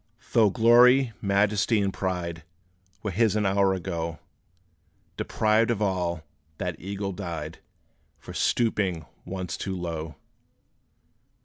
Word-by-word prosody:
Though 110 -3 +5
glory, 120 +3 +5
majesty, 100 +2 +2
and 100 -1 0
pride 90 -3 -3 0.6
Were 105 - -2
his 110 +2 +2
an 105 -1 +1
hour 95 0 +3
ago, 85 -3 -4 1.0
Deprived 110 +1 +1
of 115 -3 0
all, 90 -5 -1 0.3
that 90 -3 -3
eagle 100 +1 -4
died, 85 -5 -6 0.6
For - - -11
stooping 95 -8 0 0.2
once 90 -2 -4
too 95 -1 -4
low! 80 -3 -5
95 Hz, 110 wpm, -26 LUFS, 85-105 Hz, 1.0 s, Though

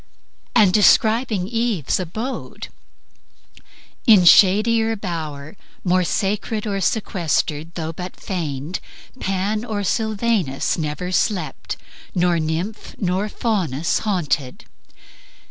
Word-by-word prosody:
And 195 -4 +5
describing 215 0 +3
Eve's 225 - 0
abode: 220 +9 -5 0.7
"... - - -26
In 185 -4 +6
shadier 220 +5 +5
bower, 160 -6 -5 0.3
More 185 0 +2
sacred 210 +4 -1
or 200 -2 -2
sequestered, 170 -6 -1
though 160 -1 -4
but 180 +2 -7
feigned, 155 -3 -4 0.4
Pan 195 +3 -1
or 215 -4 -3
Sylvanus 215 - 0
never 155 +3 -3
slept, 180 -6 -1 0.4
nor 175 -1 +2
nymph 165 +7 -3
Nor 190 +2 -1
Faunus 175 - 0
haunted." 160 - -2
185 Hz, 95 wpm, -21 LUFS, 165-215 Hz, 0.7 s, In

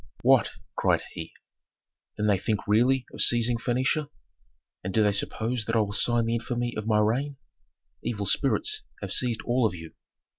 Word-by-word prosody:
"What?" - - +5 0.3
cried - - +2
he. 80 - -7 0.9
"Then 105 - 0
they 100 -3 +3
think 105 +1 -1
really 120 +5 +3
of - - -3
seizing 120 0 +3
Phœnicia! 130 +5 0 0.7
And 95 +1 -4
do 110 - +5
they 105 - +4
suppose 110 +3 -2
that 115 - -1
I - - +4
will 100 -1 -2
sign 120 +2 +1
the 115 - 0
infamy 120 +1 -2
of 110 0 -4
my 110 -1 +3
reign? 130 +7 +1 0.7
Evil 105 -4 -2
spirits 110 +3 +1 0.2
have - - -3
seized 120 -3 0
all 120 -1 +2
of 90 - -6
you!" 80 -1 -10
115 Hz, 175 wpm, -27 LUFS, 105-120 Hz, 0.9 s, What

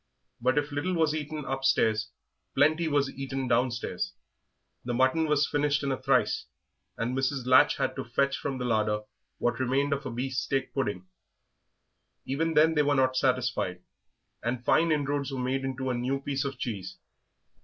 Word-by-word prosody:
But 130 +4 +2
if 145 +1 0
little 170 +6 -1
was 160 -2 +2
eaten 155 -1 -4
upstairs, 130 -4 +1 0.5
plenty 155 +4 +3
was 145 -2 +2
eaten 135 -1 -4
downstairs; 115 -7 -1 0.7
the 120 0 -2
mutton 130 +6 +3
was 150 0 +3
finished 145 0 +1
in 140 - 0
a 130 - -3
trice, - - +1 0.5
and 120 +3 -1
Mrs. 135 -1 -1
Latch 130 0 +5
had - - -1
to - - -2
fetch 140 0 0
from 135 -2 -3
the 125 - -3
larder 105 -2 +1 0.4
what 120 0 0
remained 135 +3 +1
of 140 0 -3
a - - -4
beefsteak 130 +2 -2
pudding. 105 -9 -2 1.2
Even 160 +4 -1
then 160 +2 +5
they 150 - +3
were 145 0 +2
not 130 -1 +2
satisfied, 125 -9 0 0.6
and 120 +1 -3
fine 165 0 +4
inroads 145 -1 0
were 135 - -4
made 130 +2 -1
into 130 0 -2
a - - 0
new 125 +3 -1
piece 140 0 -2
of 140 -2 -4
cheese. 100 -7 -5
135 Hz, 165 wpm, -28 LUFS, 125-145 Hz, 1.2 s, Latch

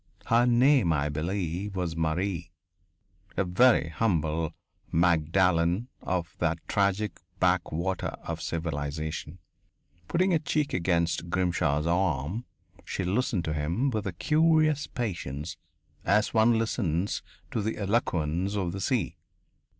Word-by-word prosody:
Her 120 +2 +4
name, 125 - +4
I 75 -1 +1
believe, 90 +5 -2
was 90 -3 -2
Marie 85 +2 -1 0.9
a - - +3
very 95 -1 +4
humble 80 -5 0 0.4
Magdalen 85 +4 +2
of 90 -4 -2
that 85 -1 +1
tragic 100 -1 0 0.2
back 90 -1 +2
water 90 +4 -1 0.2
of 80 0 -4
civilization. 80 0 -3 0.7
Putting 185 +3 +2
her 165 - +3
cheek 150 -1 -1
against 85 -1 0
Grimshaw's 85 -5 +1
arm, 85 - 0 0.4
she - - -3
listened 100 0 0
to 80 - -1
him 85 - 0
with 110 -3 -2
a 95 - -3
curious 155 - +3
patience 85 - -4 0.5
as 105 +3 +2
one 115 +1 +5
listens 100 -5 -1 0.3
to 110 - -1
the 110 +2 -2
eloquence 95 -3 0
of 95 -4 -1
the 95 +2 -5
sea. 125 +2 0
90 Hz, 120 wpm, -28 LUFS, 80-110 Hz, 0.9 s, one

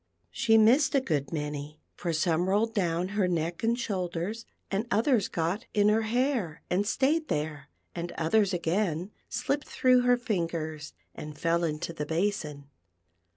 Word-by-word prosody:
She 225 -2 +3
missed 250 +8 +5
a - - +6
good 150 - -2
many, 150 -1 -4
for 170 - -3
some 165 +2 +1
rolled 220 +3 +2
down 180 -3 0
her 200 -2 +1
neck 170 -1 -1
and 230 +1 +1
shoulders, 190 0 -3 0.2
and 205 +4 -1
others 230 -1 +2
got 170 +6 -2
in 205 0 +5
her 215 +1 +3
hair 225 - -1
and 195 +3 +1
stayed 305 +7 +1
there; 150 -1 -3 0.2
and 175 0 -4
others, 200 +5 +2
again, 180 +1 -1 0.2
slipped 285 +1 -1
through 255 -1 +4
her 245 0 +4
fingers 165 -9 -3 0.2
and 150 0 -8
fell 170 +1 +1
into 160 +1 -2
the 150 -2 -4
basin. 160 -5 -2
180 Hz, 155 wpm, -28 LUFS, 160-225 Hz, 0.2 s, a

